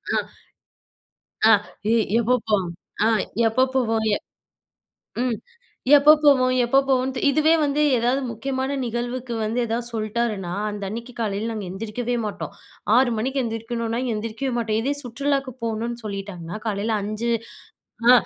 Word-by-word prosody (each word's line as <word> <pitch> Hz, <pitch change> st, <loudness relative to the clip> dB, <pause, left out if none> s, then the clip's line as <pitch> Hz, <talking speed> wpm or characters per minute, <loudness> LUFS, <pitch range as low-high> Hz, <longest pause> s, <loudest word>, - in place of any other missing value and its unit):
அ -, -, +3 dB, 1.3 s
அ -, -, +9 dB, 0.4 s
எ -, -, +4 dB, 0.2 s
எப்போ 245 Hz, +2 st, +2 dB
போவோம்? 200 Hz, -4 st, +2 dB, 0.4 s
ஆ -, -, +5 dB, 0.4 s
எப்போ 255 Hz, +4 st, +3 dB
போவோம்? 225 Hz, -3 st, +1 dB
எ -, -, -3 dB, 1.1 s
ம். 245 Hz, -3 st, 0 dB, 0.6 s
எப்போ 290 Hz, +2 st, +7 dB
போவோம்? 255 Hz, -3 st, +5 dB
எப்போ 270 Hz, +3 st, +4 dB
போவோன்ட்டு. 260 Hz, 0 st, +1 dB
இதுவே 310 Hz, +3 st, +4 dB
வந்து 285 Hz, +1 st, +1 dB, 0.2 s
ஏதாவது 245 Hz, +4 st, +1 dB
முக்கியமான 265 Hz, +4 st, -2 dB
நிகழ்வுக்கு 240 Hz, +1 st, -3 dB
வந்து 230 Hz, +3 st, -1 dB
எதாவது 235 Hz, +1 st, -2 dB
சொல்ட்டாருன்னா, 215 Hz, -4 st, -2 dB, 0.2 s
அந்த 205 Hz, -1 st, -6 dB
அன்னைக்கு 235 Hz, +3 st, -6 dB
காலையில 215 Hz, 0 st, -1 dB
நாங்க 210 Hz, -3 st, -4 dB
எந்திரிக்கவே 225 Hz, +4 st, -3 dB
மாட்டோம். 205 Hz, -, -6 dB, 0.4 s
6 250 Hz, -1 st, +4 dB
மணிக்கு 265 Hz, +4 st, 0 dB
எந்திரிக்கணும்னா, 230 Hz, +1 st, -3 dB
எந்திரிக்கவே 225 Hz, +5 st, -3 dB
மாட்டோம். 220 Hz, -2 st, 0 dB
இதே 280 Hz, +2 st, +1 dB
சுற்றுலாவுக்கு 270 Hz, +2 st, -1 dB
போகணுன்னு 230 Hz, +1 st, -2 dB
சொல்லிட்டாங்கன்னா, 195 Hz, -3 st, -5 dB
காலையில 210 Hz, +1 st, 0 dB
5 215 Hz, +3 st, -2 dB, 0.8 s
ஆ -, -, +10 dB
235 Hz, 130 wpm, -23 LUFS, 215-255 Hz, 1.3 s, ஆ